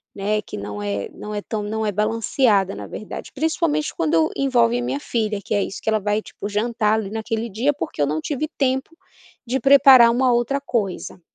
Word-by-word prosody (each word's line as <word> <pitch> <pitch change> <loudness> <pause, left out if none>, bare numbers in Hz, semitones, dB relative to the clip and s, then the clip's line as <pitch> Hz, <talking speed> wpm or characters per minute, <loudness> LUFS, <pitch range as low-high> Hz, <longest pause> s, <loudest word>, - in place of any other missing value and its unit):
né, 210 +2 -1
que - - -8
não 105 0 -6
é 100 -1 -3
não 210 0 -8
é 205 - -2
tão 210 0 -4
não 220 +1 -3
é 210 - 0
balanceada 210 -1 +1
na - - -7
verdade, 215 - -8
principalmente 310 0 0
quando 160 0 +2
envolve 245 -3 +2
minha 275 +3 -2
filha, 215 -6 -2
que - - -3
é 200 - +2
isso, - - -6
que - - -1
ela 215 -1 +2
vai 210 +1 0
tipo 205 - -8
jantar 215 0 0
ali 210 -3 -2
naquele 225 +1 -3
dia, 245 +9 0
porque 270 - -5
eu - - +4
não 155 +1 -1
tive 300 +1 -2
tempo 265 +1 0 0.5
de 260 +3 -1
preparar 270 -4 +7
uma 250 +1 +2
outra 250 +4 0
coisa. 205 -10 -3
220 Hz, 200 wpm, -22 LUFS, 205-260 Hz, 0.5 s, preparar